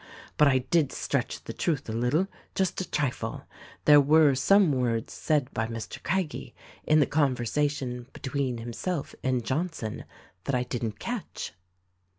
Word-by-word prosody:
But 150 - +6
I 130 -2 +4
did 165 -5 +3
stretch - - -2
the - - -6
truth 150 -5 -1
a - - -3
little, 125 +11 +1 0.3
just 190 -1 0
a 185 - -6
trifle: 140 -4 -2 0.4
There 145 -1 +8
were 150 0 +5
some 190 +6 +5
words 120 -4 0
said 150 -5 0
by 110 0 -1
Mr. 115 -2 -6
Craggie 185 -3 -2 0.3
in 155 0 +4
the 145 - +5
conversation 135 -2 0
between 130 -2 -2
himself 130 +8 -4
and 130 -3 0
Johnson 150 -6 -2 0.4
that 140 - 0
I 125 - +1
didn't 115 -4 -3
catch.' 235 -3 -5
140 Hz, 150 wpm, -28 LUFS, 125-155 Hz, 0.4 s, There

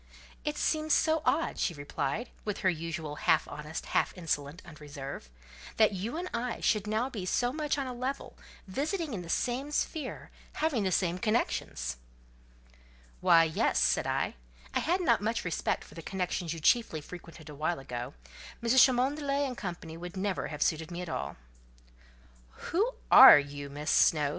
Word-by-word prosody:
"It 300 0 -2
seems 310 -1 +2
so 315 0 +2
odd," 330 - +1
she 170 - 0
replied, 145 - -3
with 210 -2 -4
her 185 - +3
usual 160 -2 -5
half - - +2
honest 150 +2 -6
half - - 0
insolent 150 -2 -3
unreserve, 145 - -8 0.5
"that 215 -1 +5
you 215 - -4
and 360 +2 -3
I 235 0 -2
should 210 -1 +1
now 220 +4 0
be 225 -8 -6
so 245 +7 0
much 300 -1 -1
on 275 - -1
a 255 - -5
level, 255 +3 -4 0.3
visiting 300 - -2
in 195 - -3
the 170 - -10
same 255 +9 -1
sphere; 295 -1 -3 0.2
having 305 -8 0
the 190 - +1
same 180 0 +1
connections." 125 - -1 1.2
"Why, 165 - +6
yes," 160 -1 +1
said - - +2
I; - - 0 0.4
"I - - +2
had 360 +3 +1
not 235 - +3
much 225 0 -1
respect 170 - -1
for - - -16
the 165 - -8
connections 180 -1 -3
you 165 - -4
chiefly 165 0 +2
frequented 165 -1 -11
awhile 155 +3 -2
ago: 120 - -6 0.5
Mrs. 235 +2 +6
Cholmondeley 275 +2 +1
and 255 -2 -4
Co. 180 -7 -4 0.2
would 175 +2 -8
never 190 -1 -1
have 150 -1 -1
suited 160 +1 -1
me 175 0 -5
at 175 - -7
all." - - -4 1.4
"Who 435 +8 +1 0.2
are - - +11
you, 145 0 -4
Miss 145 +2 -3
Snowe?" 150 -3 +4
190 Hz, 165 wpm, -30 LUFS, 160-260 Hz, 1.4 s, are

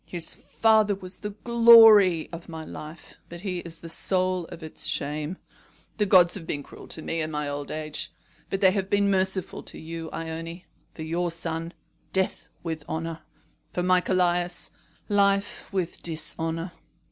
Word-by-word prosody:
His 170 -2 -3
father 220 -2 +2
was 185 -1 -9
the 210 - -5
glory 225 -5 +7
of 170 +1 -8
my 160 -1 -7
life, 155 +2 -10
but 170 0 -9
he 185 -3 -3
is 170 -1 -8
the 165 - -8
soul 185 0 +1
of 165 - -10
its 160 - -4
shame. 150 +4 -2 0.6
The 210 -1 +2
gods 180 -3 +6
have 170 -5 -5
been 145 - -3
cruel - - -13
to 160 - -4
me 165 0 -2
in 155 - -2
my 150 -1 -3
old 145 0 -4
age; 155 -1 -4 0.4
but 195 - -2
they 190 -2 +6
have 195 -1 -2
been 200 0 +3
merciful 190 -1 0
to - - -9
you, 165 0 -6
Ione. 165 +2 -6 0.3
For 160 - -6
your 170 +2 -1
son, 165 0 -2 0.4
death 190 0 -1
with 160 -3 -4
honour. 165 0 -3 0.5
For 180 - -1
my 180 0 +4
Callias, 175 -1 0 0.4
life 200 -1 +1
with 185 -3 -3
dishonour. 165 +1 -3
175 Hz, 165 wpm, -26 LUFS, 160-190 Hz, 0.6 s, glory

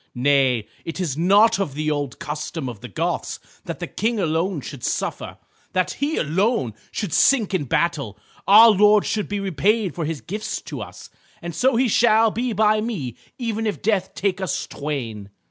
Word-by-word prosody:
Nay, 130 -4 +2 0.2
it 165 +2 -6
is 165 -8 -1
not 200 +7 +4
of 155 -9 -2
the 155 +1 -1
old 145 -3 -3
custom 150 0 -5
of 120 -5 -7
the 125 - -7
Goths 100 - -3 0.3
that - - -5
the - - -4
King 225 +2 -2
alone 165 0 0
should 135 -2 -9
suffer, - - -3 0.4
that 185 -1 +1
he 295 +3 -2
alone 165 - 0 0.2
should 205 -7 -4
sink 235 -8 +3
in 170 -6 0
battle. 140 - -1 0.3
Our 220 +3 +9
lord 210 0 +5
should 210 -2 -1
be 205 0 -2
repaid 195 +2 0
for 170 - -3
his 160 -1 -3
gifts 210 - -4
to - - -7
us, - - -10 0.3
and 170 0 -6
so 255 +10 +2
he 250 +2 +3
shall 225 0 +4
be 240 +3 -2
by 215 0 +3
me 170 - -4 0.2
even 225 -3 -2
if 210 - -4
death 195 -3 0
take 195 -1 -1
us 185 - -2
twain." 120 -9 -5
185 Hz, 180 wpm, -22 LUFS, 145-215 Hz, 0.4 s, Our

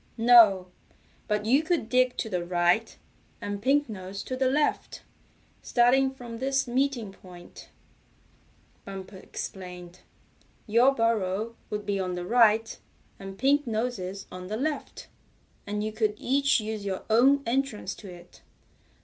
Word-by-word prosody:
"No, 225 -6 +6 0.6
but 210 -1 -1
you 265 +6 +4
could 320 -7 -1
dig 255 +1 +2
to - - -2
the 180 -5 -2
right, 175 +5 +1 0.4
and 205 -2 -5
Pink 285 +5 +2
Nose 195 -2 -7
to 255 - -4
the 260 0 +1
left, 295 +2 -1 0.6
starting 255 +3 +3
from 240 -3 -9
this 270 +1 0
meeting 250 -4 -1
point," 180 -2 -14 1.1
Bumper 195 0 -9
explained. 180 -2 -8 0.7
"Your 240 +5 +4
burrow 225 -1 0
would 210 -1 -4
be 200 -1 -1
on 185 -1 -2
the 175 0 -5
right, 225 0 +3 0.4
and 195 0 -9
Pink 280 +4 +2
Nose's 215 -4 -3
on 180 0 -8
the 215 +3 -3
left, 300 +4 -4 0.6
and 210 +1 -2
you 215 - -2
could 215 -1 0
each 275 +2 +2
use 215 -1 -5
your 195 -2 -4
own 265 +5 +4
entrance 235 -5 -1
to 200 -4 -11
it. 175 0 -15
220 Hz, 140 wpm, -27 LUFS, 195-255 Hz, 1.1 s, No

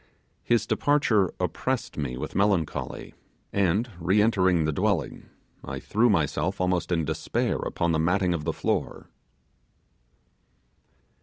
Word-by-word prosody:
His 115 -3 +1
departure 110 - +2
oppressed - - -2
me 65 -4 -3
with 75 +4 -5
melancholy, 95 -6 -1 0.4
and, 100 +4 +2
re 90 +5 +2
entering 95 -6 +3
the 80 - +1
dwelling, 95 0 -1 0.3
I - - -5
threw 115 +4 +2
myself 95 +1 0
almost 90 -1 0
in 80 -3 +1
despair - - -1
upon 85 0 -1
the 80 - +1
matting 90 +2 +2
of 80 -3 -3
the 80 - 0
floor. - - -3
90 Hz, 125 wpm, -26 LUFS, 80-105 Hz, 0.4 s, entering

